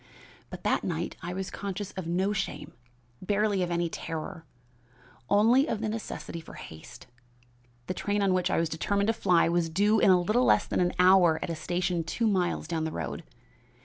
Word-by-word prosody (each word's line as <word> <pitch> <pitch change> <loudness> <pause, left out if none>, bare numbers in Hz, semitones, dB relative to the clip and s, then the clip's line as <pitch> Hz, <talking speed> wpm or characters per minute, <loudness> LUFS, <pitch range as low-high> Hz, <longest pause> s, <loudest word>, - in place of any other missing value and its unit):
But - - -9
that - - +1
night - - -3
I 175 - -5
was 190 0 -4
conscious 200 0 -5
of 190 -3 -6
no 190 +4 0
shame, 210 - -4 0.5
barely 205 0 +1
of 180 - -1
any 170 0 0
terror, 160 -1 -6 0.8
only 235 +8 +4
of 220 - -1
the 220 0 -2
necessity 210 -6 -6
for 160 - -12
haste. 120 +10 -11 0.8
The - - -3
train 205 +3 -1
on 195 -1 +3
which 185 -1 +1
I - - +1
was 165 - +1
determined 200 +6 -1
to - - +3
fly 180 -7 +3
was 170 -1 +1
due 205 +6 +3
in - - +4
a 185 -1 +6
little 215 +8 +2
less - - +4
than - - -2
an 180 -1 +1
hour 180 -3 +5
at 170 - -3
a - - -3
station 175 +1 -1
two 230 +8 -2
miles 185 -6 0
down 160 -1 -2
the 160 - -2
road. - - -4
185 Hz, 195 wpm, -28 LUFS, 170-205 Hz, 0.8 s, a